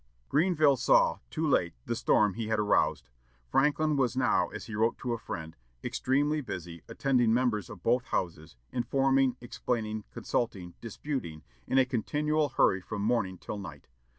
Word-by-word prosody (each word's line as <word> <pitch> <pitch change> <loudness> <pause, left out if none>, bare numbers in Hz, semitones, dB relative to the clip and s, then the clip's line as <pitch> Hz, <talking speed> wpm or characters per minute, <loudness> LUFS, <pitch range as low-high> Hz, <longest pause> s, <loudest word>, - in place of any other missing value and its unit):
Grenville 155 -3 +3
saw, - - +4
too 160 0 -1
late, 85 - +2
the 120 - -1
storm 105 -3 +3
he 115 +1 -4
had 110 0 +1
aroused. 105 -10 +1 0.4
Franklin 150 +2 +2
was 130 -2 +1
now, 130 - +3
as - - -8
he 110 - -8
wrote 110 +2 +1
to 125 -2 -3
a 115 - -3
friend, 80 -5 -6 0.3
"extremely 145 +4 +1
busy, 85 - -7
attending 125 -4 +2
members 115 -6 +1
of 95 -5 -11
both 125 +2 +2
houses, 80 - -3 0.2
informing, 135 0 +2
explaining, 110 -3 -3
consulting, 95 -7 -3
disputing, 115 - -5 0.2
in 130 - +1
a 130 - +6
continual 150 +5 0
hurry 95 -7 +3
from 100 +2 -5
morning 105 -5 0
till 105 - -6
night." 90 -8 -10
120 Hz, 155 wpm, -29 LUFS, 105-135 Hz, 0.4 s, a